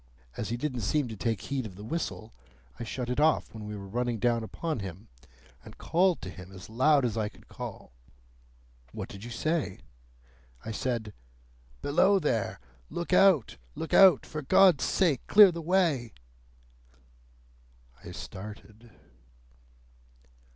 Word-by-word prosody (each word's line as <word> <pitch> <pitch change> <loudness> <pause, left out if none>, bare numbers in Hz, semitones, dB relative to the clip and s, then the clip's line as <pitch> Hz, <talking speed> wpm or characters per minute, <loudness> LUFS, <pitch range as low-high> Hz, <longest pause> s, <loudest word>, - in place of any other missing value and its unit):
As - - -4
he 120 - -2
didn't 130 -1 -3
seem 145 +6 0
to 110 - -6
take 110 -2 -2
heed 140 -2 -3
of 95 - -13
the 100 - -10
whistle, 115 -4 -4 0.5
I - - -4
shut 120 +2 -4
it 125 +3 -1
off 155 +1 +2
when 110 -1 -8
we 105 - -5
were 100 -1 -8
running 120 +3 -1
down 120 0 +1
upon 155 +5 -4
him, 95 +2 -8 0.5
and - - -13
called 180 +1 +2
to 95 - -6
him 90 0 -11
as 95 +2 -11
loud 140 +3 +4
as 115 -2 -2
I 105 -1 -1
could - - -21
call." - - -8 1.0
"What - - -6
did 100 +1 -10
you 120 - -7
say?" 150 - -2 0.8
"I - - -4
said, 110 -2 -3 0.7
'Below 190 +7 +4
there! 145 - -1 0.3
Look 170 +1 -4
out! 185 - +4 0.2
Look 160 - -5
out! 190 -7 +7
For 155 - -5
God's 180 +2 +5
sake, 160 -10 +2
clear 205 -2 +8
the 170 0 -6
way!'" 160 -9 +1 1.9
I - - -9
started. 105 +3 -10
125 Hz, 150 wpm, -29 LUFS, 110-160 Hz, 1.9 s, clear